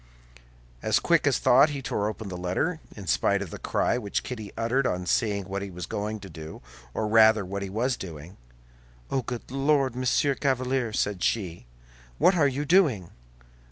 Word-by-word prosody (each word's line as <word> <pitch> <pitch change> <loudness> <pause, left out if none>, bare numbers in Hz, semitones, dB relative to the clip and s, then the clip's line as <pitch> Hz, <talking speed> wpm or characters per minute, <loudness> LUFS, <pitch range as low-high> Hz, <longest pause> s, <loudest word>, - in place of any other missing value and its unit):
As - - +2
quick - - +2
as - - +3
thought, 135 +5 +5
he 140 -2 -5
tore 120 -6 -1
open 110 0 -7
the 90 - -5
letter, 90 - -1 0.2
in 100 - -9
spite 100 +2 +1
of 95 - -9
the - - -7
cry 120 - 0
which 100 -4 -2
Kitty 110 -6 -6
uttered 125 +4 +1
on 90 0 -2
seeing 100 +1 +1
what 100 0 -3
he 100 - -5
was 90 -1 -6
going 105 +4 -4
to 95 - -9
do, 80 -4 -10 0.3
or 110 - -1
rather, 110 -1 +5
what 100 +2 -4
he 100 - -4
was 120 +6 -1
doing. 85 0 -9 0.8
"Oh, 135 - +1
good 120 0 -7
Lord, 135 -2 +2
Monsieur 130 +2 +1
Chevalier," 130 -3 0
said 105 -3 -1
she, 90 - -1 0.5
"what 185 - +5
are 150 -5 +4
you 140 +2 -2
doing?" 145 - +3
110 Hz, 185 wpm, -26 LUFS, 95-130 Hz, 0.8 s, thought